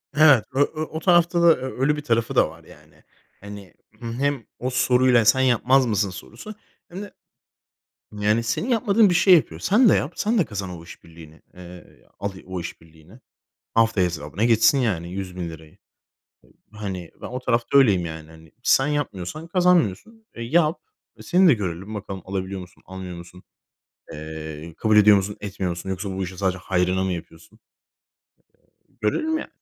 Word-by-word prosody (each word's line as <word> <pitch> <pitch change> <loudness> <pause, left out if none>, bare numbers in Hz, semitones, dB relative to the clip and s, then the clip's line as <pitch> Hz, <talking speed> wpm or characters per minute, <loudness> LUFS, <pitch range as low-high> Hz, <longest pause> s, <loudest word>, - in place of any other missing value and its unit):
Evet, 145 -6 +6
ö 135 - -1
ö 155 +2 0
o 155 0 -6
tarafta 175 0 +3
da 170 - +5
ö 130 0 -7
öyle 150 +3 +2
bir 150 - -5
tarafı 115 -5 -1
da - - +4
var, - - -15
yani. - - -19 0.4
Hani, 100 -1 -11 0.3
hem 125 +2 -2
o 125 - -2
soruyla 125 -2 +3
sen 130 +4 +5
yapmaz 130 +1 +3
mısın 105 -3 0
sorusu 115 - -10 0.3
hem 185 +3 -7
de, 205 - -10 1.0
yani, 105 +2 +1
senin 115 - -2
yapmadığın 220 -3 +3
bir - - +1
şey 185 +1 +6
yapıyor. 85 - +1
Sen 220 - +4
de - - +5
yap. 140 - -1
Sen 220 +2 0
de 185 - +3
kazan 100 -7 -6
o 85 -2 -9
işbirliğini. 80 -2 -15
Eee, 90 -1 -14
al 100 +1 -3 0.2
o 95 -1 -5
işbirliğini. 80 +5 -12 0.5
Haftaya 115 -5 +3
hesabına 85 +4 -3
geçsin 120 +6 +4
yani 95 -10 -1
₺100.000'i. 90 -4 -7 1.0
Iıı, 105 - -13
hani, 95 -5 -6
ben - - -6
o 125 - -5
tarafta 125 +2 +1
öyleyim, 100 -10 +4
yani, 80 -1 -8
hani. 80 -1 -17
Sen 135 +2 +3
yapmıyorsan 145 - -4
kazanmıyorsun, 180 - +1
e, 115 - -9
yap. 155 +6 +1 0.4
E, - - -13
seni 185 +1 +4
de 160 - +7
görelim 95 -1 -5
bakalım 95 -2 -6
alabiliyor 95 0 -4
musun, 90 - -15
almıyor 95 -2 -8
musun, 85 +1 -13 0.7
eee, 80 +1 -8
kabul 110 -1 +2
ediyor 105 -1 +7
musun, 100 +1 -3
etmiyor 100 -2 -4
musun 85 +2 -5
yoksa 95 +1 -4
bu 95 0 -3
işi 90 0 -7
sadece 95 -1 -1
hayrına 90 +1 0
mı 95 - -1
yapıyorsun. 80 -1 -11 1.3
Eee, - - -33
görelim 315 - 0
ya. - - -6
105 Hz, 170 wpm, -23 LUFS, 90-140 Hz, 1.3 s, de